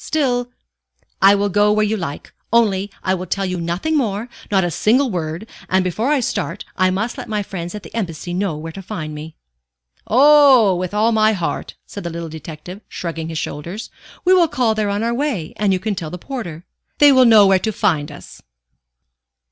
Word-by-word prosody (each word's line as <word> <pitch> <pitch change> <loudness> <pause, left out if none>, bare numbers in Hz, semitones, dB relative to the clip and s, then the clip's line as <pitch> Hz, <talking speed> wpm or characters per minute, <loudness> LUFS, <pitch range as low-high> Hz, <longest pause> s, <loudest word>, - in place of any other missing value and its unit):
Still 245 -5 0 0.4
" - - -63 0.3
"I 195 +1 +7
will 200 0 0
go 205 +2 +3
where 215 0 +2
you 215 +1 0
like, 165 -8 -6 0.2
only 205 -4 +2
I 185 - +1
will 185 0 -4
tell 195 +2 -1
you 180 -2 -3
nothing 175 - -1
more, 225 -4 -1 0.2
not 195 -2 +2
a 175 - -1
single 245 - +2
word; 170 +3 -4 0.2
and 190 0 +2
before 215 +8 -1
I 295 -3 +2
start, 200 -4 -3
I 185 0 +3
must 205 +6 -2
let - - -8
my 210 -1 -1
friends 175 -1 -6
at 210 - -7
the - - -12
Embassy 175 -5 -4
know 180 -4 -1
where 165 +2 -7
to 195 - -9
find 165 -6 -6
me." 155 +1 -8 0.7
"Oh, 265 -5 +6
with 180 +2 -4
all 220 +2 +3
my 220 0 +3
heart," 175 -5 -4
said 200 - -8
the 170 - -3
little 170 0 -6
detective, 160 +5 -9
shrugging 165 -2 -5
his 160 - -4
shoulders. 170 +8 -5 0.3
"We 370 - +5
will 355 -3 +5
call 245 -6 +1
there 215 -1 -1
on 205 +2 -1
our 235 +1 0
way, 240 - -2
and 205 -2 +1
you 190 - +2
can 210 +3 -2
tell 165 -5 -5
the 180 - -6
porter. 180 - -7 0.3
They 290 -1 +7
will 260 -1 +6
know 220 -3 +7
where 195 -1 +4
to 220 - -2
find 165 -8 0
us." 145 - -12
200 Hz, 210 wpm, -19 LUFS, 170-225 Hz, 0.7 s, I